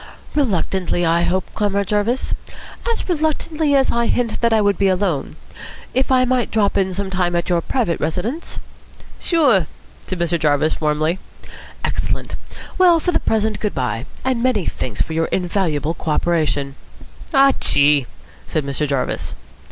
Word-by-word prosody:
"Reluctantly, 190 - 0
I 165 +1 +3
hope, 185 +2 0
Comrade 200 -1 0
Jarvis. 215 +5 0 0.6
As 460 - -3
reluctantly 310 -2 0
as 270 -1 +3
I 235 0 +1
hint 240 -3 0
that 235 -1 +3
I 220 - +4
would 200 -3 +2
be 200 - +3
alone. 185 -7 0 0.6
If 260 +1 +1
I 255 -1 +4
might 250 -1 +1
drop 205 -3 +1
in 190 -1 +1
some 190 +1 -3
time 180 -2 0
at 170 +1 -1
your 175 -1 +2
private 215 -4 -1
residence?" 185 - -3 0.6
"Sure," 260 - +3 0.4
said 185 - -3
Mr. 170 0 0
Jarvis 150 +1 +1
warmly. 155 +3 +1 0.6
"Excellent. - - -2 0.5
Well, 350 -2 +6
for 355 - 0
the - - +2
present, 220 -1 0
good 210 - -2
bye. 125 -1 -2 0.2
And 255 -3 +1
many 240 -8 +1
thanks 110 -5 -2
for 160 - -6
your 165 0 +1
invaluable 170 -5 -1
co 165 - -6
operation." 150 -4 0 0.6
"Aw 275 0 +7
chee!" 145 -2 +4 0.4
said 155 -3 -1
Mr. 140 +2 -1
Jarvis. 135 -2 -2
190 Hz, 155 wpm, -20 LUFS, 160-240 Hz, 0.6 s, Aw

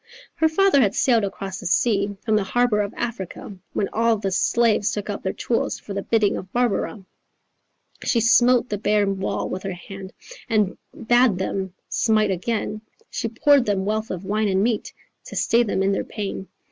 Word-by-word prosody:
"Her 320 - +2
father 380 -3 +4
had 205 -5 +2
sailed 235 -4 +3
across 195 -1 -4
the - - -5
sea 200 +1 +1
From 220 -2 +2
the 210 - +2
harbour 235 +1 +2
of 200 -1 -3
Africa 215 -4 -5 0.2
When 200 - 0
all 230 0 +2
the 200 -2 -2
slaves 215 +2 +2
took 210 0 -3
up 200 - -5
their 190 - -1
tools 235 - -1
For 200 - -8
the 200 - -2
bidding 215 -1 +1
of 185 - -8
Barbara. 225 -4 -1 1.0
She 235 - +2
smote 240 +2 +4
the 205 - -2
bare 210 0 +2
wall 195 0 -2
with 185 - -4
her 195 -1 -4
hand 190 +2 -9 0.4
And 210 -4 +1 0.2
bad 240 -3 +3
them 190 0 -3
smite 215 -3 +2
again; 215 +3 -2 0.3
She 230 - -2
poured 265 +2 +3
them 195 -2 0
wealth 215 +2 -1
of 185 0 -5
wine 210 +2 0
and 190 0 +2
meat 230 -1 -1 0.3
To - - -9
stay 235 - +3
them 200 -4 0
in 195 - +2
their 195 - 0
pain. 195 -2 -5
210 Hz, 185 wpm, -23 LUFS, 195-230 Hz, 1.0 s, father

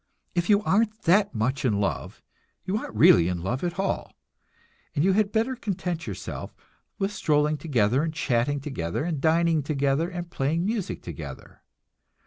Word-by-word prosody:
If 175 +2 -1
you 205 0 +5
aren't 215 +2 +1
that 195 - +3
much 130 +6 0
in 110 -6 +1
love, 100 - -3 0.4
you 190 - -1
aren't 215 - -4
really 85 -5 +6
in 90 -1 -2
love 125 - -2
at 175 0 -2
all, 195 0 -2 0.8
and 145 - +2
you 195 - +4
had 210 0 +2
better 230 +5 +1
content 180 -7 -3
yourself - - -6 0.4
with 195 0 -1
strolling 150 -4 +2
together 130 -5 +1
and 160 0 -1
chatting 145 -2 0
together 125 - -3
and 160 -4 -2
dining 165 0 +3
together 140 +2 0
and 175 -1 -6
playing 160 +5 0
music 215 -2 -2
together. - - -9
160 Hz, 160 wpm, -26 LUFS, 135-190 Hz, 0.8 s, really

